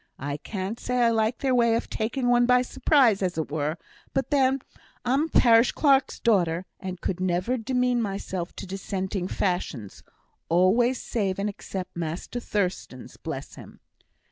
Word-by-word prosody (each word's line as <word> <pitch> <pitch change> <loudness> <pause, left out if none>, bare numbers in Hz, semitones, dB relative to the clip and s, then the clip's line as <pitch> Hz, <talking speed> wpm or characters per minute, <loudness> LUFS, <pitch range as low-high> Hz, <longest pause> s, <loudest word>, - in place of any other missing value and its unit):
I 145 +2 -4
can't 195 +6 -5
say 250 0 -1
I 230 - +4
like 220 +1 +1
their 265 -2 0
way 235 -2 +4
of 230 - -2
taking 245 +3 -2
one 245 0 +4
by 250 0 +5
surprise, 250 -6 +3
as 180 -3 -1
it 160 -2 -3
were; 155 +1 -1 0.4
but 270 -2 -1
then 270 -2 +3 0.5
I'm 270 +5 +2
a - - -4
parish 235 -5 +5
clerk's 275 -3 +3
daughter, 180 -6 +2
and 185 -2 -6
could 180 0 -3
never 185 +6 0
demean 250 0 0
myself 195 -4 -4
to - - -7
dissenting 190 -1 -3
fashions, 175 - -3 0.5
always 215 +9 +3
save 195 -5 -2
and 200 +1 -1
except 190 -2 -7
Master 170 +8 -4
Thurstan's, 185 - -3
bless - - -6
him. - - -13
210 Hz, 160 wpm, -26 LUFS, 180-245 Hz, 0.5 s, by